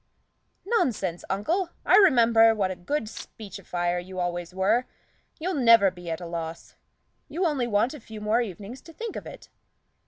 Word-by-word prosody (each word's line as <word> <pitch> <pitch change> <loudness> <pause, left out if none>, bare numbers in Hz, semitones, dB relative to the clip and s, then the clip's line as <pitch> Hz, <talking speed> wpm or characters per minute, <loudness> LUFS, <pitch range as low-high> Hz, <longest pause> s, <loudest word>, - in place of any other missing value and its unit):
"Nonsense, 225 - 0
uncle! 330 - 0 0.2
I - - +5
remember 230 - +6
what 195 -3 0
a - - -4
good 285 +12 -2
speechifier 185 -5 -4
you 185 0 -8
always 175 -1 -3
were; 205 +7 +1 0.5
you'll 365 +4 -2
never 230 - +5
be 175 -1 -9
at 160 - -3
a 175 - -7
loss. 165 -1 -6 0.6
You 340 +6 -1
only 280 -7 0
want 220 +4 +1
a 300 - -9
few 220 -2 -10
more 215 +3 +1
evenings 210 +4 -7
to 330 - -14
think 455 +4 -6
of - - -6
it." - - -11
215 Hz, 165 wpm, -26 LUFS, 180-260 Hz, 0.6 s, remember